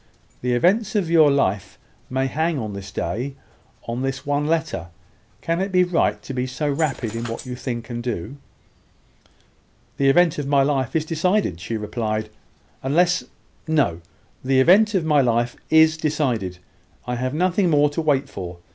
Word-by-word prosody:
The 125 0 0
events 195 - +2
of 180 -6 0
your 160 -3 +6
life 105 -9 0 0.3
may 130 +1 0
hang 160 +4 0
on 110 -5 -4
this 100 0 -8
day, 130 +7 -3 0.5
on 120 +2 -3
this 135 0 -3
one 145 +1 0
letter. 160 - -1 0.5
Can 165 +2 -1
it 195 +1 -2
be 180 -1 +4
right 175 -2 +1
to 135 - -6
be 125 0 -2
so 130 +4 -3
rapid 140 -6 -1
in 115 +1 -3
what 115 +2 -5
you 125 -1 -5
think 120 -2 -5
and 120 0 -4
do?" 120 +1 -4 1.6
"The 135 -1 +3
event 165 +2 +4
of 145 - -3
my 140 -1 +4
life 135 -2 -1
is 155 -1 +1
decided," 165 - 0
she 110 +6 -4
replied, 110 0 -3 0.5
"unless 175 +7 +2 0.4
No 145 - +1 0.4
the 130 0 +2
event 205 +9 +5
of 175 -4 +1
my 150 -2 +4
life 120 -1 +1
is 160 0 +5
decided. 130 - -1 0.5
I 125 - -3
have 130 +3 -2
nothing 180 +2 +2
more 145 -2 +3
to 165 - -2
wait 140 -3 +1
for. 90 -7 -7
140 Hz, 170 wpm, -22 LUFS, 120-160 Hz, 1.6 s, your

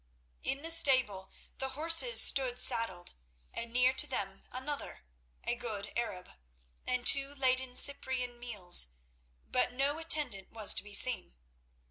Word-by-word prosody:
In 275 +2 -5
the 330 - -4
stable 255 -12 +3 0.3
the 265 - -5
horses 330 +10 +4
stood 255 -3 +3
saddled, 230 -8 0 0.4
and 230 0 -8
near 250 +2 +1
to - - +2
them 195 -6 -7
another—a - - -9
good 220 -4 -8
Arab—and 60 - -8
two 275 0 +4
laden 260 -2 -2
Cyprian 250 -3 +2
mules, 180 - 0 0.5
but 70 - -1
no 280 +4 -3
attendant 295 - -2
was 220 -3 +1
to - - -4
be 205 0 -8
seen. 235 - -1
245 Hz, 125 wpm, -30 LUFS, 195-270 Hz, 0.5 s, horses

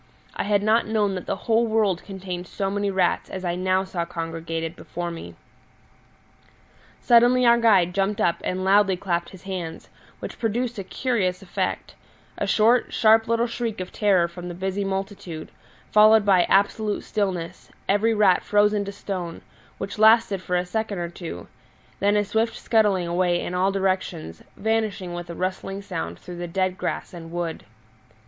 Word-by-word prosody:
I - - -2
had 205 0 +2
not 220 +2 +3
known 210 -2 +1
that 185 - -6
the - - 0
whole 230 +1 +3
world 215 -5 +1
contained 185 -2 -6
so 195 +2 -3
many 205 0 -1
rats 190 -2 0
as 185 -1 -6
I 175 - 0
now 185 +1 +1
saw 180 -3 -3
congregated 165 0 -4
before 175 +1 -5
me. 85 - -9 1.6
Suddenly 245 +1 +5
our 235 0 +6
guide 195 -7 +4
jumped 195 +2 0
up 170 - +2
and 185 +1 -2
loudly 195 -1 +4
clapped 175 -2 -2
his 190 - -14
hands, 180 -4 -6 0.3
which - - -8
produced 235 +1 -1
a - - -3
curious 190 -4 -1
effect 180 - -3 0.4
a - - -2
short, 230 +3 +3
sharp 225 -1 +4
little 230 +1 +2
shriek 230 -3 -3
of 185 0 -5
terror 190 -5 +3
from 175 +1 -9
the 175 - -6
busy 190 +2 -2
multitude, 195 -4 -5 0.4
followed 215 0 +6
by 190 -3 +5
absolute 205 +2 +1
stillness, 185 -4 -3 0.2
every 220 +3 +2
rat 200 -4 +4
frozen 210 0 +2
to 200 - -5
stone, 185 -4 -6 0.3
which 195 +2 -6
lasted 220 -3 +5
for 180 -1 -2
a 180 0 +1
second 210 +2 -3
or 170 -1 -3
two; 165 - -8 0.5
then 205 +1 +3
a 205 - +1
swift 225 +3 0
scuttling 205 -5 +2
away 175 0 +1
in 175 - -4
all 185 +2 +2
directions, 185 - -2 0.2
vanishing 215 -4 -1
with 175 0 -6
a 170 - -6
rustling 190 +2 -3
sound 85 - -5
through 175 -1 -10
the 175 0 -4
dead 185 +1 -1
grass - - -4
and 165 -2 -9
wood. 170 -1 -4
195 Hz, 170 wpm, -24 LUFS, 175-210 Hz, 1.6 s, our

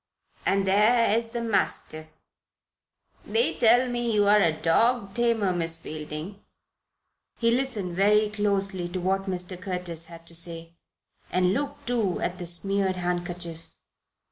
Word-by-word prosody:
"And 195 0 +2
there 215 +3 +4
is 230 0 0
the 235 0 -4
mastiff. 155 -7 0 1.1
They 465 - +2
tell 240 +3 +5
me 240 -1 -1
you 210 -2 +3
are 210 0 +5
a 165 - +3
dog 195 +7 +1
tamer, 230 -5 +1
Miss 165 -2 -2
Fielding." 155 +5 -7 1.0
He 230 -1 +2
listened 235 -8 -1
very 210 +3 +4
closely 195 -3 0
to 185 +1 -4
what 195 +2 -1
Mr. 180 0 -3
Curtis 180 -3 -3
had 165 0 -13
to 170 - -8
say, 165 0 -3 0.6
and 180 0 +2
looked, 280 +4 -4
too, 225 -7 0
at 180 +1 -3
the 175 - -5
smeared 190 +2 -1
handkerchief. 175 -2 -4
195 Hz, 140 wpm, -26 LUFS, 175-215 Hz, 1.1 s, tell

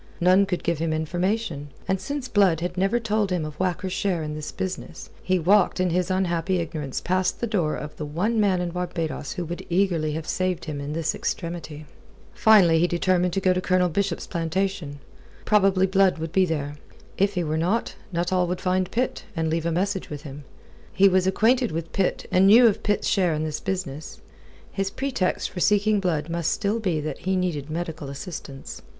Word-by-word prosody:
None 185 +3 +4
could 180 -3 -2
give 170 -2 0
him 165 0 0
information; 175 0 -2 0.2
and 190 0 0
since 280 +4 -4
Blood 195 -8 +3
had 175 0 -3
never 195 +6 +1
told 215 -2 0
him 175 -4 0
of 155 - -6
Whacker's 185 0 -1
share 180 -5 0
in 150 0 -4
this 155 0 -5
business, 180 -3 -6
he 185 0 +1
walked 185 +3 +3
in 185 -1 +1
his 180 +1 0
unhappy 185 -1 0
ignorance 155 -5 -3
past 185 +1 0
the - - 0
door 185 -9 0
of 150 0 -7
the 150 - -4
one 205 +10 0
man 195 -4 +2
in 175 -1 -2
Barbados 165 -5 -3
who 175 - -4
would 170 +2 -6
eagerly 170 -4 +1
have 160 0 -4
saved 185 -2 -1
him 150 -3 -4
in 145 +1 -4
this 165 0 -1
extremity. 165 -3 -4 0.5
Finally 185 -7 +5
he 175 - +3
determined 180 +1 +1
to 195 - +1
go 185 -1 +3
up - - +4
to 180 - -1
Colonel 185 -1 +2
Bishop's 190 +1 -1
plantation. 170 -2 -2 0.5
Probably 195 -3 +4
Blood 190 -1 +3
would 160 0 -5
be 190 +1 +4
there. 145 -3 -3 0.4
If 200 +1 +2
he 180 - 0
were 155 -1 -1
not, 180 +8 0 0.2
Nuttall 175 +1 +1
would 180 +1 -2
find 185 0 0
Pitt, 250 +2 -2
and 160 -1 -1
leave 165 0 0
a - - 0
message 190 +3 -1
with 150 -1 -7
him. 145 -1 -9 0.5
He 195 +1 +5
was 185 -1 +3
acquainted 235 +5 +3
with 165 +1 -5
Pitt 195 -2 0
and 190 +1 +5
knew 230 +5 +8
of 220 -2 +3
Pitt's 205 -1 0
share 180 -5 +2
in 155 - -2
this 155 -1 -3
business. 170 -6 -4 0.5
His 195 -1 -1
pretext 250 -6 -1
for 180 - -6
seeking 210 +2 +3
Blood 165 -5 -1
must 170 -1 -1
still 210 +2 0
be 180 -8 0
that 155 - -5
he 190 +1 -1
needed 165 -6 -2
medical 160 -3 -4
assistance. 140 -1 -8
180 Hz, 200 wpm, -24 LUFS, 160-195 Hz, 0.5 s, knew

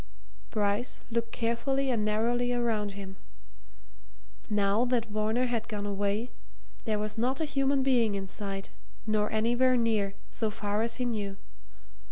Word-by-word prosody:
Bryce 210 +3 +1
looked 230 0 -1
carefully 260 +4 0
and 225 -4 +1
narrowly 235 +3 +1
around 225 -4 0
him. 195 -1 -8 1.3
Now 205 +1 +3
that 245 -2 +1
Varner 215 +3 0
had 235 -2 -1
gone 205 -1 -3
away, 205 +3 -1 0.5
there 215 -2 +1
was 215 +1 -3
not 255 +3 +1
a 320 - +1
human 275 -2 +2
being 240 -6 +3
in 195 -1 -3
sight, 195 0 -5 0.3
nor 215 -1 +1
anywhere 240 +4 +3
near, 215 -4 +1 0.2
so 220 - -1
far 205 0 -1
as 230 +1 0
he 250 - -1
knew. 205 -4 -2
220 Hz, 145 wpm, -30 LUFS, 205-245 Hz, 1.3 s, Now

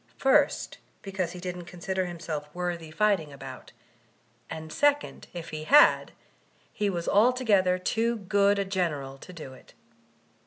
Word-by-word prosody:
First, 270 -1 +2 0.2
be 195 - -7
cause 185 -3 -2
he 180 - -8
didn't 180 -1 -6
consider 180 +2 -3
himself 160 -4 -5
worth 175 -1 -2
fighting 200 -8 +2
about; 135 -1 -10 0.8
and 160 0 -7
second, 290 0 +1
if 170 -2 -7
he 155 0 -5
had, 295 - +6 0.6
he 205 -1 0
was 170 -3 -3
altogether 205 -5 +3
too 225 +5 0
good 200 -1 +2
a 200 - 0
general 150 -8 -2
to - - -11
do 155 -6 -9
it. 130 - -18
180 Hz, 145 wpm, -27 LUFS, 160-200 Hz, 0.8 s, had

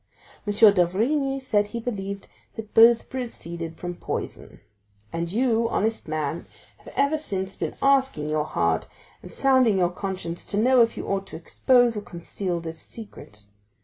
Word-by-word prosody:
M. - - +1 0.2
d'Avrigny 245 - +1
said 210 -6 +1
he 235 +3 -5
believed 200 -4 -5 0.3
they 225 - -5
both 225 +2 +5
proceeded 170 - -6
from 175 0 -5
poison; - - -6 0.5
and 170 0 -2
you, 230 0 +2
honest 225 0 -1
man, 155 +1 -3 0.3
have - - -13
ever 285 +3 +2
since 195 -9 -3
been - - -4
asking 265 - +2
your 155 0 0
heart - - 0 0.3
and - - -11
sounding 260 -6 +3
your 175 -1 +2
conscience 185 -2 -5
to 205 - -3
know 250 +3 +5
if 230 0 +2
you - - -4
ought 195 0 -2
to - - -9
expose 245 +7 +3
or 210 - -3
conceal 175 0 -4
this 165 -1 -7
secret. 105 - -11
205 Hz, 155 wpm, -25 LUFS, 175-245 Hz, 0.5 s, both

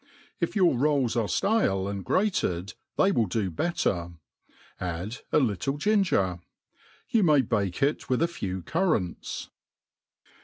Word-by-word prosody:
If - - -1
your 185 -7 +4
roils 140 -2 +1
are 115 -3 +1
ftale 100 - +1
and 100 -1 -4
graced, 100 - 0 0.2
they 195 - +4
will 115 - +2
do 95 0 -1
better; 85 - -1 0.7
add 90 +6 -4
% - - -44
little 135 +2 +1
ginger. 155 - +2 0.7
You 225 - +3
may 150 -7 +5
bake 100 -2 -1
it 145 +2 0
With 130 +5 +2
a - - +3
few 95 - -5
currants. 155 - -1
120 Hz, 130 wpm, -27 LUFS, -, 0.7 s, may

